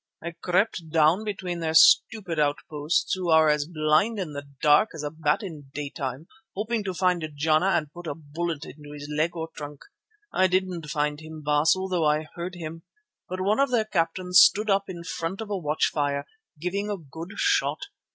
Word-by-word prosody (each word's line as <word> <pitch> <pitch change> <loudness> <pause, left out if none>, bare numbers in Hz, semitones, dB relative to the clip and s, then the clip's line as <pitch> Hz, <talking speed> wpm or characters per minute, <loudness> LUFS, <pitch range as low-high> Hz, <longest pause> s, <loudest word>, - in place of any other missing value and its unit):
I 170 - -5
crept 180 0 -1
down 160 +5 +3
between 185 -4 -4
their 160 -1 -2
stupid 175 +1 +5
outposts, 150 +1 0
who 185 -2 -2
are 160 -1 +6
as 150 0 +1
blind 160 +7 +2
in 175 -7 -4
the 145 0 -7
dark 150 +9 +5
as 155 - -6
a 145 - -3
bat 155 +4 0
in 155 -7 -8
daytime, 140 -1 -4 0.3
hoping 220 +2 -1
to 190 -2 -3
find 180 -2 +1
Jana 155 +4 +2
and 165 -6 0
put 175 -1 -9
a 145 - -3
bullet 160 0 -4
into 150 0 -11
his 145 0 -8
leg 165 +3 0
or 165 -1 -4
trunk. 145 -1 -8 0.5
I 185 - +4
didn't 180 -4 -1
find 150 0 -1
him, 155 -1 -10
Baas, 150 +3 +3
although 185 -3 -1
I 150 +1 +2
heard 175 +2 -5
him. 165 -1 -7 0.5
But 185 +1 -4
one 205 +6 +1
of 275 0 +3
their 235 -3 +2
captains 180 -1 +2
stood 210 +1 +5
up 195 0 +2
in 175 -2 -7
front 170 +2 -4
of 220 -2 -6
a - - 0
watchfire, 145 -3 0 0.3
giving 195 +5 -2
a 205 - -2
good 165 +4 -9
shot. 400 0 +1
165 Hz, 190 wpm, -26 LUFS, 150-185 Hz, 0.5 s, are